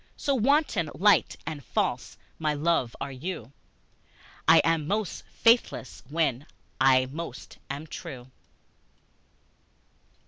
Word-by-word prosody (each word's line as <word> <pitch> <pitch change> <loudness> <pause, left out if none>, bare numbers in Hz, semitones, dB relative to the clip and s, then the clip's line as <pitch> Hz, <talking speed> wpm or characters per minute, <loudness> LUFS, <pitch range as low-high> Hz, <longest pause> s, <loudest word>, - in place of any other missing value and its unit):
So 280 - 0
wanton, 270 - +2
light 205 +3 +3
and 155 -3 -5
false, - - -2 0.2
my 155 -2 0
love, 145 -5 0
are 140 - -4
you, 135 -3 -6 1.0
I 165 - +8
am 165 -3 +1
most 210 0 -2
faithless 230 - +2
when 145 -4 0 0.3
I 130 -1 +5
most 135 -1 -8
am 140 +3 -5
true. 130 -6 -9
155 Hz, 105 wpm, -27 LUFS, 135-175 Hz, 1.0 s, I